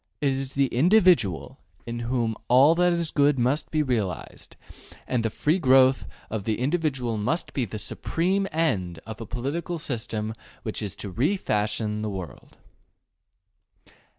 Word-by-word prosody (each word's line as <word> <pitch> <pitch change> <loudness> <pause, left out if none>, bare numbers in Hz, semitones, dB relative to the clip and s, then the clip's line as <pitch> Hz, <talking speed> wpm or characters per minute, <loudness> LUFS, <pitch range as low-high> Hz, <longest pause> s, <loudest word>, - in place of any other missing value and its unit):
It 145 - +2
is 135 0 -3
the 140 0 +3
individual 160 - +3 0.3
in 120 0 -4
whom 120 -2 -1
all 135 +6 +6
that 180 +1 +3
is 170 -2 0
good 145 -1 +3
must 130 +5 0
be 155 -1 +1
realized, 110 - -3 0.5
and 125 -2 0
the 115 - 0
free 155 - 0
growth 130 -3 +4 0.2
of 110 -2 -4
the 110 +1 -1
individual 130 -5 -1
must 130 +12 -1
be 130 - 0
the 110 0 -6
supreme 185 - -1
end 95 - 0
of 110 0 -8
a 115 - -6
political 140 - -3
system 110 -6 -3 0.3
which 110 - -3
is 105 -3 -4
to 100 - -6
re 145 - +1
fashion 105 - -1
the 110 - -2
world. 95 -5 -8
125 Hz, 150 wpm, -25 LUFS, 110-155 Hz, 0.5 s, all